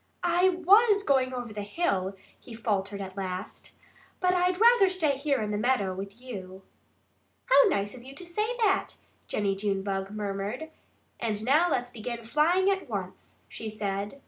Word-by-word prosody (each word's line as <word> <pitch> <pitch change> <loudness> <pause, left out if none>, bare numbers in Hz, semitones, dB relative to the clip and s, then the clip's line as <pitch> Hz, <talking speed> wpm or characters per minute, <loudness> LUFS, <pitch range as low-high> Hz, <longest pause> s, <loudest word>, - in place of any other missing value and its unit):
"I 355 +2 +4 0.2
WAS 410 +1 +6
going 265 -6 +2
over 245 -3 -5
the 210 - -4
hill," 200 - -1 0.2
he 235 - -11
faltered 200 -3 -2
at 190 -1 -7
last. 185 -2 -6 0.5
"But 365 0 +2
I'd 360 0 +1
rather 460 -4 +6
stay 325 -7 +1
here 280 0 0
in 210 - -3
the 205 - -1
meadow 215 -5 +1
with 195 +3 -8
you." 190 -7 -9 0.8
"How - - +6
nice 205 - -1
of 255 - -11
you 265 +2 -12
to 360 - -9
say 425 +7 -2
that!" 410 -5 +1 0.3
Jennie 200 -2 0
Junebug 195 -1 -2
murmured. 210 +8 -4 0.5
"And 220 -2 -2
now 310 +7 +4
let's 245 -5 -1
begin 235 +1 -6
flying 315 +10 +2
at 385 -1 -3
once!" - - -7
she 220 - -7
said. 205 +1 -3
240 Hz, 165 wpm, -28 LUFS, -, 0.8 s, WAS